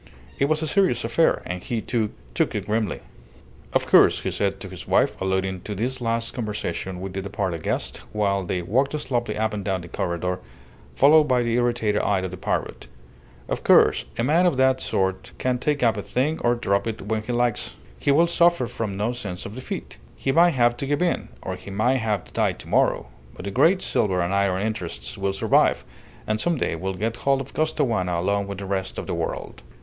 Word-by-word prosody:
It 140 - +4
was 155 +2 0
a - - -1
serious 180 - +2
affair, 120 +9 +2
and 90 0 -4
he, 115 +4 -2
too, 110 -1 -1 0.2
took - - 0
it - - -2
grimly. 110 -2 -1 0.7
"Of - - +1
course," - - +5
he - - -2
said - - -1
to - - -6
his - - -8
wife, - - +3
alluding 95 -1 -1
to 105 - -5
this 125 +6 -2
last 115 0 -1
conversation 95 -5 -3
with 95 0 -6
the 95 - -3
departed 95 -4 -3
guest, - - -2
while 100 -2 0
they 90 0 -2
walked 135 - +1
slowly 120 -4 -2
up 110 0 0
and 105 -1 -3
down 95 -2 -1
the 85 - -10
corredor, 90 +2 -2 0.6
followed 150 +3 +6
by 125 -3 +2
the 115 -1 -1
irritated 120 -3 +1
eye 100 - +1
of 95 -1 -4
the 90 - -7
parrot - - -3 0.6
"of - - -3
course, - - +5
a 115 - 0
man 165 +7 +4
of 150 - +1
that 130 0 +3
sort 95 0 -1
can 125 -1 0
take 145 0 0
up 115 -2 +4
a - - -2
thing 140 +9 -1
or 120 0 +2
drop 100 -3 0
it 110 0 -4
when 110 +2 -1
he 110 - -5
likes. 120 -2 0 0.2
He - - -1
will 160 +5 +5
suffer 170 -4 +3
from 115 -4 -4
no 105 +4 0
sense 100 -7 -5
of 100 - -7
defeat. 130 +2 -6 0.2
He 135 - -1
may 170 +5 +6
have 120 -6 +2
to 140 - -3
give 145 +4 +1
in, 175 - -1
or 95 - -3
he 90 - -11
may 110 +7 +2
have 110 -6 -1
to - - -19
die - - +1
to - - -12
morrow, - - +2 0.3
but - - -9
the 100 - -3
great 185 - +3
silver 95 -4 +1
and 85 +2 -1
iron 100 -1 +1
interests 90 - -4
will 100 0 -1
survive, 95 - +2 0.4
and 110 0 0
some 170 -2 +1
day 105 - -1
will 95 +3 -3
get 115 +5 -2
hold 135 +2 +2
of 135 0 -7
Costaguana 115 - 0
along 100 +2 0
with 100 -1 -5
the 100 - -6
rest 95 -1 -3
of - - -4
the - - -3
world." - - -4
110 Hz, 215 wpm, -24 LUFS, 95-130 Hz, 0.7 s, followed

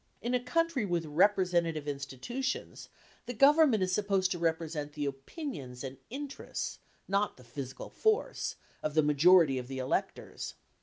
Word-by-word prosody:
In 240 +2 -2
a 250 - +3
country 330 0 +1
with 175 -4 -1
representative 170 -2 +2
institutions 145 - -4 0.4
the 245 - -4
Government 275 -4 +6
is 185 - 0
supposed 195 -2 +1
to 175 - -1
represent 160 -3 -1
the 145 -1 -3
opinions 135 - -6
and 135 0 -7
interests 280 +2 -5 0.3
(not 200 +2 0
the 125 - -15
physical 130 +2 -7
force) 440 +1 0 0.3
of 155 0 -2
the 155 - +5
majority 150 -1 +5
of 125 - -7
the 135 0 -5
electors. 130 0 -3
170 Hz, 145 wpm, -31 LUFS, 145-240 Hz, 0.4 s, Government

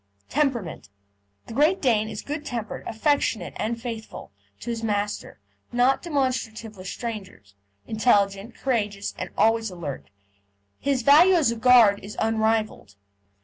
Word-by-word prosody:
TEMPERAMENT 255 - -1 0.6
The - - -9
Great 310 +9 +3
Dane 220 -5 +2
is - - -6
good 295 +1 -5
tempered, 235 -6 -5
affectionate, 225 - 0
and 230 +2 -2
faithful 230 -2 -7 0.3
to 235 - -4
his 230 -1 -4
master, 205 - -3 0.3
not 250 +3 +3
demonstrative 250 -8 -2
with 185 -1 -9
strangers; 190 - -7 0.3
intelligent, 210 -1 +1
courageous, 210 -6 -2
and - - -5
always 225 0 +3
alert. 165 - -7 0.7
His 275 -3 0
value 325 +8 +7
as 305 -9 +3
a - - -3
guard 230 -4 +6
is 205 +2 -9
unrivalled. 220 - 0
225 Hz, 130 wpm, -25 LUFS, 210-255 Hz, 0.7 s, value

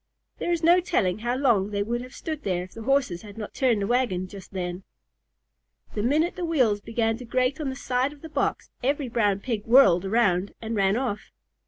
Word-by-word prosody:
There 345 - -1
is 340 -1 0
no 345 +2 +6
telling 215 - 0
how 240 +2 -1
long 235 -8 +2
they 205 -1 -1
would 240 +3 -2
have 255 +1 -10
stood 315 -2 -5
there 180 -6 -1
if 185 - -12
the 225 - -9
Horses 255 -8 +1
had 205 -1 -12
not 215 - -6
turned 235 -6 +2
the - - 0
wagon 215 -6 0
just 190 0 -11
then. 180 -1 -4 1.1
The 210 - -2
minute 305 - +1
the 365 - -4
wheels 255 -11 +2
began 225 0 -1
to 250 - -9
grate 255 +4 0
on 285 - -2
the 265 - -4
side 255 0 0
of 295 -1 -15
the - - -6
box, - - -2
every 275 0 0
Brown 205 -4 +1
Pig 225 -4 -3
whirled 215 -8 +6
around 195 -2 +1
and 225 0 -4
ran 195 +1 +2
off. 240 -5 -3
230 Hz, 215 wpm, -26 LUFS, 200-270 Hz, 1.1 s, no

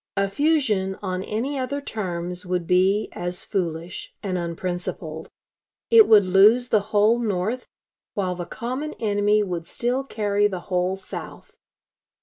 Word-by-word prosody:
A 195 0 +2
fusion 220 -9 +1
on 185 -1 -2
any 265 +8 -2
other 265 +2 -2
terms 180 -8 -3
would 180 -1 -2
be 190 +4 +2
as 175 0 -4
foolish 170 -3 -4
and 190 -2 -2
unprincipled. 170 -2 -4 0.6
It 455 -2 +8
would 210 -3 +7
lose 210 +7 +5
the 215 - +4
whole 215 +2 +4
North, 220 +2 -2 0.5
while 185 -3 0
the 175 -1 -5
common 260 +6 -4
enemy 210 -1 +2
would 175 -4 -4
still 250 +3 -1
carry 205 -5 +1
the 185 -3 -5
whole 180 0 -1
South. 190 -1 -9
200 Hz, 135 wpm, -24 LUFS, 180-225 Hz, 0.6 s, It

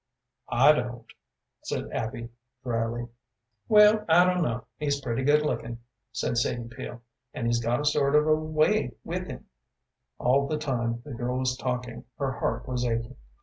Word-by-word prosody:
"I - - +6
don't," 125 -4 -2 0.6
said - - -4
Abby, 115 +1 -4 0.3
dryly. 120 -1 -2 0.6
"Well, 210 0 +7
I 175 +2 +7
don't 180 0 +2
know. 120 -5 -1
He's 145 -1 0
pretty 125 -2 -2
good 150 +2 +4
looking," 120 -4 -2 0.3
said 120 - -1
Sadie 120 0 -2
Peel, 120 0 -8 0.3
"and 120 - -3
he's 120 0 +1
got 120 +4 +1
a - - -3
sort 145 -1 +2
of 150 0 +5
a 155 - +4
way 155 0 +1
with - - -3
him." - - -8 0.7
All 140 +3 +2
the 155 - -1
time 120 -5 -2
the 145 - -7
girl 125 +2 -2
was 130 -1 0
talking 125 -1 -4
her 135 -2 -1
heart 120 -1 -2
was 125 -1 -1
aching. 115 +1 -2
125 Hz, 165 wpm, -27 LUFS, 120-150 Hz, 0.7 s, Well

